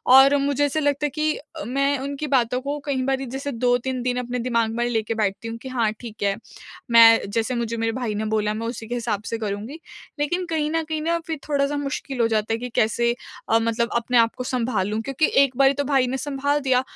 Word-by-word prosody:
और 270 +2 +8
मुझे 285 0 +2
ऐसा 290 +2 -1
लगता 290 0 +1
है - - +1
कि 305 0 +1
अ, 310 +1 -9
मैं 275 +3 +1
उनकी 280 +2 -4
बातों 250 0 +1
को 285 +2 -3
कईं 265 -3 -1
बारी 270 0 0
जैसे 270 +3 -4
2-3 250 +1 0
दिन 250 0 0
अपने 250 0 -3
दिमाग 230 -2 0
में 240 +1 0
लेके 225 -1 -1
बैठती 215 0 -2
हूँ 230 0 -5
कि 260 +3 -9
हाँ, 235 -4 +1
ठीक 225 -4 -8
है। 200 -1 +2 0.6
मैं 230 -1 +8
जैसे 230 +4 -1
मुझे 235 -1 -2
मेरे 225 0 0
भाई 230 -3 -3
ने 215 +1 -2
बोला 215 -1 0
मैं 225 +2 -4
उसी 225 -2 -6
के 245 - -3
हिसाब 225 -4 -2
से 230 - -3
करूँगी। 215 +7 -5 0.4
लेकिन 350 +5 0
कहीं 315 -3 -1
न 325 0 0
कहीं 310 0 -3
ना 330 +2 0
फ़िर 320 -2 -3
थोड़ा-सा 285 -1 +1
मुश्किल 275 -2 -4
हो 230 - +4
जाता 220 0 0
है - - 0
कि 250 +1 -5
कैसे 235 +2 +2 0.4
अ, 225 - +4
मतलब 230 +1 0
अपने 235 +1 +1
आपको 230 +2 +2
सँभालूँ? 225 -4 -1
क्योंकि 275 +6 0 0.2
एक 260 -2 -1
बारी 275 0 +5
तो 285 +1 -1
भाई 270 -2 +2
ने 265 +2 -2
संभाल 285 +1 -1
दिया। 260 -2 +3
250 Hz, 230 wpm, -23 LUFS, 230-280 Hz, 0.6 s, और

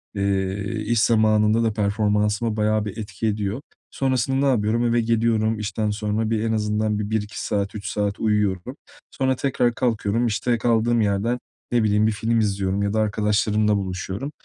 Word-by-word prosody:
eee, 100 +2 -1
iş 115 -2 +2
zamanında 110 0 +3
da 110 -2 +1
performansıma 105 +1 0
bayağı 105 0 +1
bir 105 +1 -6
etki 105 0 -4
ediyor. 105 +3 -2 0.3
Sonrasında 135 -1 0
ne 140 - +2
yapıyorum? 115 +1 +1
Eve 120 0 +2
geliyorum 110 -1 +1
işten 105 0 -2
sonra 105 +1 -1
bir, 110 -1 0
en 115 - 0
azından 105 0 0
bir 105 - -3
1-2 110 -1 -3
saat, 100 0 -2
3 100 -2 -6
saat 100 -1 -2
uyuyorum. 105 +1 0 0.4
Sonra 130 -1 0
tekrar 125 -3 0
kalkıyorum. 115 -1 0
İşte, 120 +2 0
kaldığım 115 0 +2
yerden, 105 +4 0 0.3
ne 120 -2 +2
bileyim, 105 0 +3
bir 110 - +2
film 115 +2 0
izliyorum 100 -2 0
ya 100 +1 -1
da 110 - +1
arkadaşlarımla 105 0 +1
buluşuyorum, 95 +7 -4
110 Hz, 165 wpm, -23 LUFS, 105-115 Hz, 0.4 s, zamanında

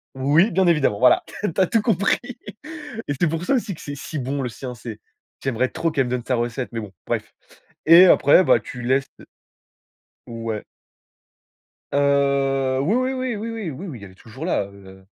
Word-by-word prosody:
oui, 145 +10 +3
bien 185 +1 +2
évidemment, 150 -11 +2
voilà. 125 0 +5 0.2
Tu - - +2
as - - +5
tout 225 - +2
compris. 200 -3 +1 0.9
Et 145 - -1
c'est 175 - +3
pour 165 +2 -3
ça 275 - +2
aussi 225 -5 -2
que - - -13
c'est 145 - -6
si 145 +2 -6
bon, 135 +2 -3
le 125 - -2
sien, 125 +1 -7
c'est 110 -2 -8 0.4
j'aimerais 130 -1 0
trop 165 - -1
qu'elle 135 -3 +1
me 125 - -5
donne 125 -1 -2
sa 125 - 0
recette 120 +2 -3
mais 115 - -3
bon, 105 -3 -9 0.2
bref. - - -3 0.5
Et 170 +3 +9
après, 160 0 +6
ben, - - +5
tu 125 - -9
laisses 130 +3 +1 1.2
Ouais. 115 -2 -5 1.3
Heu, 140 -2 +2
oui, 175 +11 +1
oui, 255 +1 0
oui, 255 -2 -2
oui, 215 +2 -5
oui, 225 -6 -4
oui, 165 +9 -8
oui, 135 -9 -8
elle 95 - -11
est - - -20
toujours 120 +9 -9
là, 180 - +1
heu. 95 -1 -15
140 Hz, 195 wpm, -22 LUFS, 125-175 Hz, 1.3 s, Et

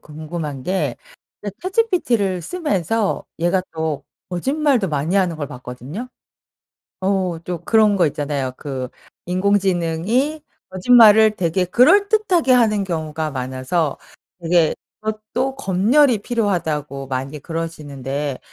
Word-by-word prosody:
궁금한 155 -2 -6
게 185 +4 -1 0.5
이제 205 -2 -4
ChatGPT를 345 - +1
쓰면서 225 - -1
얘가 175 +3 +1
또 160 -3 -3 0.3
거짓말도 265 - +1
많이 155 +5 -1
하는 180 -4 +1
걸 145 -2 -4
봤거든요. 125 - -8 0.9
어 185 -3 0
또 175 -2 -5
그런 215 -3 +4
거 175 -3 +3
있잖아요. 140 -3 -3
그 130 -3 -5 0.4
"인공지능이 195 - +1 0.3
거짓말을 215 +2 +6
되게 180 0 0
그럴듯하게 360 - +4
하는 215 -5 +3
경우가 160 -3 -3
많아서 130 +4 -2 0.5
되게 165 -1 +3 0.3
그것도 220 +5 -3
검열이 235 +4 +3
필요하다."고 160 - -2
많이 135 +3 -4
그러시는데 145 -4 -4
180 Hz, 280 characters per minute, -20 LUFS, 155-220 Hz, 0.9 s, 거짓말을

